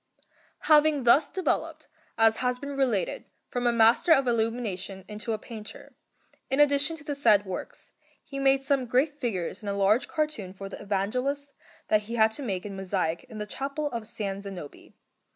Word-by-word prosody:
Having 300 -2 +4
thus 275 +5 +5
developed, 375 -1 -2 0.3
as 225 0 +4
has 250 0 0
been 280 +2 -6
related, 240 -10 0 0.2
from 245 0 -1
a - - +4
master 230 +8 +4
of 275 -4 +6
illumination 220 -5 -2
into 210 +2 -5
a 220 - 0
painter, 215 -1 -10 0.6
in 265 +2 0
addition 290 +2 +3
to 295 - -14
the 295 - -3
said 210 -8 +4
works, 190 -1 -7 0.3
he 275 -1 -7
made 270 0 +3
some 270 -2 +1
great 275 +5 +2
figures 205 - -3
in 205 - -5
a 200 - -1
large 200 +4 +3
cartoon 300 - -2
for 195 0 -8
the - - -8
Evangelists 250 +9 -1 0.4
that 215 - +4
he 235 - -3
had 220 -1 +4
to 255 - -5
make 195 -8 -3
in 200 -1 -6
mosaic 185 -1 -2
in 230 -4 -11
the 210 - -3
Chapel 280 +6 -4
of 235 - -3
S. 215 - -11 0.3
Zanobi. 190 -7 -9
235 Hz, 180 wpm, -27 LUFS, 205-280 Hz, 0.6 s, of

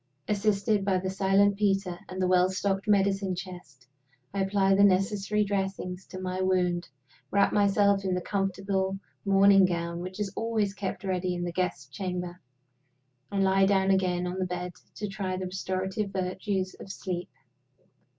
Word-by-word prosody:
Assisted 205 0 +1
by 195 -1 +2
the 185 +1 -2
silent 195 +1 +3
Peter 195 -3 0
and 185 - -6
the 185 - +2
well 180 0 +4
stocked 195 +1 -1
medicine 195 -2 +2
chest, 175 -9 -10 0.5
I 200 - 0
apply 195 0 +2
the 200 +1 +5
necessary 200 +2 +2
dressings 195 -2 -3
to 185 - -8
my 185 0 -3
wound, 180 -2 +1 0.4
wrap 200 0 +3
myself 200 -1 +3
in 185 -1 0
the - - 0
comfortable 195 0 -1 0.3
morning 195 0 +6
gown 170 -1 -1
which 185 +3 -7
is 200 -2 -2
always 220 -3 0
kept 195 -2 -4
ready 185 -1 -1
in 175 - -3
the 175 - -2
Guests' 175 -5 -2
Chamber, 180 +4 -5 0.9
and 195 -1 +1
lie 195 0 +4
down 195 -1 +3
again 180 -2 +1
on 180 +1 -3
the 185 - 0
bed 180 0 -4 0.2
to 210 - -4
try 195 -2 -3
the 185 - -3
restorative 190 +2 -2
virtues 190 0 -2
of 195 - -8
sleep. 180 -2 -4
190 Hz, 160 wpm, -28 LUFS, 185-200 Hz, 0.9 s, morning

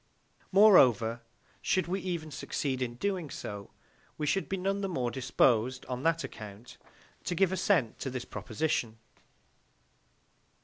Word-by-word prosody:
Moreover, 125 - +6 0.4
should 185 - +1
we 185 +3 -2
even 170 -4 -4
succeed 135 -2 -3
in 120 -2 -2
doing 185 +1 -2
so, 100 -5 -7 0.5
we 150 - -2
should 195 +6 0
be 195 - -1
none 195 +2 -1
the 195 - -2
more 125 -8 -1
disposed, 125 -1 +2
on 125 -1 -4
that 165 +2 +1
account, 105 +1 -10 0.4
to 175 - -2
give 190 +1 +3
assent 185 - +1
to 135 - -3
this 130 -1 -5
proposition. 115 -2 -2
140 Hz, 135 wpm, -30 LUFS, 120-185 Hz, 0.5 s, Moreover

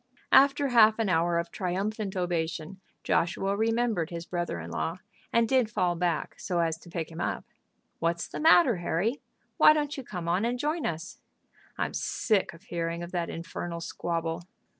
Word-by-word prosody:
After 280 +1 +5
half 220 -3 +6
an 225 -3 0
hour 170 0 +2
of 170 0 -2
triumphant 195 +2 -2
ovation, 175 0 -2 0.2
Joshua 195 +3 +1
remembered 225 -5 +1
his 170 -1 -6
brother 175 - -3
in 85 +1 -7
law, 165 - -2 0.3
and 230 0 +3
did 255 -3 +3
fall 185 -5 +1
back 170 -2 -2
so 175 -2 -1
as 165 -1 0
to 170 - -15
pick 165 -1 -4
him 165 +1 -6
up. - - -2 0.5
"What's 170 +1 0
the - - -6
matter, 315 - +6
Harry? 175 - -1 0.4
Why - - +8
don't 295 -1 -1
you 270 - -6
come 180 -7 -6
on 180 +4 +1
and 240 +2 0
join 300 +4 -1
us?" 165 +1 -5 0.6
"I'm - - -2
sick 215 -5 0
of 165 - -16
hearing 170 0 -3
of 175 - -7
that 175 -2 -2
infernal 170 +1 -5
squabble." 165 0 -3
180 Hz, 175 wpm, -28 LUFS, 170-225 Hz, 0.6 s, Why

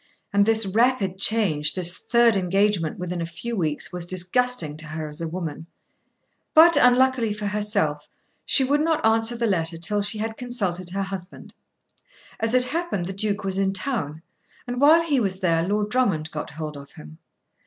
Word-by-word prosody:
And 200 +1 +3
this 225 -1 +3
rapid 205 -2 +1
change, 190 -10 +1
this 180 -1 0
third 235 -2 +3
engagement 195 -2 0
within 180 -1 -4
a - - -2
few 235 +8 -6
weeks, 160 -3 -2
was 180 -1 -3
disgusting 185 -2 +1
to 155 0 -8
her 155 0 -5
as 150 +2 -7
a 165 - -3
woman. 160 -2 -6 0.9
But, 335 +1 +8
unluckily 250 -4 +3
for 210 0 -6
herself, 205 -8 -1 0.3
she 270 - +3
would 285 +3 +1
not 320 -3 0
answer 225 +1 +2
the 235 - -1
letter 165 -5 -1
till 205 +5 0
she 210 +2 -1
had 220 +1 -4
consulted 195 -8 -2
her 195 +2 -3
husband. 195 -1 -8 0.9
As 225 +2 +2
it 250 - +4
happened 310 - -3
the 190 - -5
Duke 205 +1 -2
was 195 0 -1
in 195 0 0
town, 185 - -2 0.4
and 245 +1 -4
while 320 +4 +6
he 295 -5 +1
was 190 -4 -1
there 165 -2 +1
Lord 210 +1 -1
Drummond 195 -12 0
got 150 - -6
hold 150 -1 -7
of 140 0 -13
him. 75 +1 -13
200 Hz, 180 wpm, -23 LUFS, 170-235 Hz, 0.9 s, But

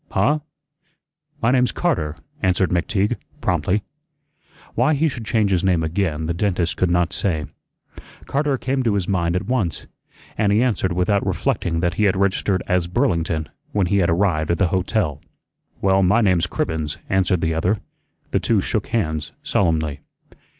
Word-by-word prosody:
"Huh? 150 +2 +2 1.0
My 115 - +4
name's 125 -1 +3
Carter," 80 - -1 0.3
answered 95 -1 +2
McTeague, 100 +6 +1 0.2
promptly. 90 - 0 0.9
Why 155 - +3
he 160 +3 +2
should 120 -6 -5
change 110 -4 +2
his 90 -1 +2
name 90 -4 +2
again 80 -2 -1
the 85 - -1
dentist 90 -2 0
could 90 - +1
not 90 0 +1
say. 80 -6 -1 0.8
"Carter" 140 -1 0
came 130 +1 -1
to 115 -5 +1
his 95 -3 -1
mind 85 -3 0
at 90 - -1
once, 105 - -1 0.5
and 105 -2 +3
he 105 +4 +4
answered 105 -7 0
without 90 +3 +1
reflecting 80 0 -1
that 85 -1 +1
he - - +4
had 95 -1 +2
registered 95 -1 +1
as 90 -2 +1
"Burlington" 85 - 0 0.3
when 100 -3 +2
he 100 +3 +1
had 90 - +2
arrived 85 -3 +1
at 85 - +2
the 90 -1 +2
hotel. 95 - 0 0.6
"Well, 95 0 +3
my 100 +5 +4
name's 90 -5 +3
Cribbens," 80 -4 -2
answered 95 -2 +1
the 80 0 +1
other. 90 +6 +1 0.5
The - - +2
two - - +2
shook - - -1
hands 80 -9 -2
solemnly. 80 -6 0
95 Hz, 165 wpm, -21 LUFS, 85-105 Hz, 1.0 s, My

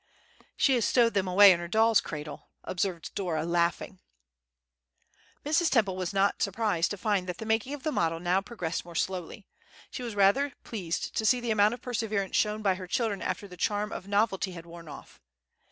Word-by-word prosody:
"She 275 - +4
has 240 -3 +2
stowed 235 0 +3
them 195 -2 0
away 195 +2 +8
in 175 - +2
her 175 - -5
doll's 220 +4 +4
cradle," 150 -1 -8
observed 180 -2 -3
Dora, 165 -5 -2
laughing. 170 +2 -1 1.5
Mrs. 315 +2 +2
Temple 205 -7 +2
was 185 -2 -3
not 200 0 +1
surprised 200 -4 0
to 205 - -4
find 195 -3 -1
that 180 - -4
the 220 - -7
making 225 +5 0
of 285 - -13
the 310 - -1
model 165 - 0
now 180 +2 +1
progressed 190 -7 -4
more 170 -1 -12
slowly; 185 +3 -3 0.5
she - - -6
was 235 -4 -5
rather 205 +9 +3
pleased 180 -7 -4
to - - 0
see 245 +3 +4
the 240 -2 -2
amount 215 +1 +3
of 245 - -18
perseverance 220 -5 -2
shown 215 0 +1
by 195 -2 +3
her 185 0 -8
children 220 -2 -1
after 200 - -3
the 180 - -11
charm 210 +3 -1
of 190 - -7
novelty 200 -2 0
had 170 -1 -9
worn 170 -1 -12
off. 145 - -12
200 Hz, 195 wpm, -28 LUFS, 180-225 Hz, 1.5 s, away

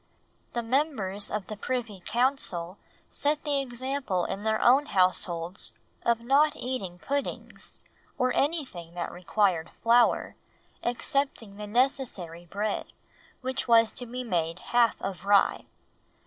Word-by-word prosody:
The 235 - -1
members 225 -7 +1
of 210 -2 -3
the 215 - -6
Privy 225 -3 -3
Council 210 -8 0 0.3
set 295 +1 0
the 290 -2 +1
example 255 -6 -2
in 195 - -4
their 220 0 +1
own 270 +4 +5
households 180 -1 0 0.3
of 235 -1 +2
not 280 +5 +4
eating 205 -9 -4
puddings, 280 +9 -5 0.3
or 255 0 +2
anything 255 - -1
that 175 - -3
required 180 -2 +1
flour, 235 +1 +4 0.5
excepting 240 -4 -1
the 210 0 -6
necessary 210 - -1
bread, 205 +4 -3 0.5
which 260 0 -2
was 230 -1 +6
to 245 - -6
be 250 +2 -4
half 185 +4 +1
made - - -2
of 190 -2 -7
rye. 200 0 +3
230 Hz, 125 wpm, -28 LUFS, 190-260 Hz, 0.5 s, was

